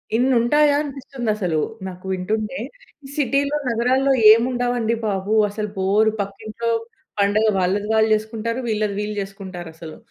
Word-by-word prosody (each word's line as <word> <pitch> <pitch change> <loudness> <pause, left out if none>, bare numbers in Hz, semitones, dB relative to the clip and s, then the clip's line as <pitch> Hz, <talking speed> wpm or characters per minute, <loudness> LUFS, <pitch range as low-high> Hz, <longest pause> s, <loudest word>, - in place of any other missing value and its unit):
ఇన్ని 255 +3 +3
ఉంటాయా 295 +4 +4
అనిపిస్తుంది 270 -4 -5
అసలు 180 -6 -1 0.3
నాకు 185 0 -9
వింటుంటే. 215 +7 -2 0.6
సిటీలో, 280 0 +1
నగరాల్లో 255 +4 +2 0.2
ఏమి 230 +2 +5
ఉండవండి 245 -2 0
బాబు. 195 +1 -1 0.2
అసలు 210 +1 -4
బోర్ 200 +3 +3
పక్కింట్లో 215 +4 -5 0.5
పండగ 205 +2 +3
వాళ్ళది 195 +3 0
వాళ్ళు 220 0 +3
చేసుకుంటారు. 225 +2 -3
వీళ్ళది 210 -2 -1
వీళ్ళు 210 0 -3
చేసుకుంటారు 190 -3 -8
అసలు. 160 -1 -10
220 Hz, 130 wpm, -21 LUFS, 200-245 Hz, 0.6 s, ఏమి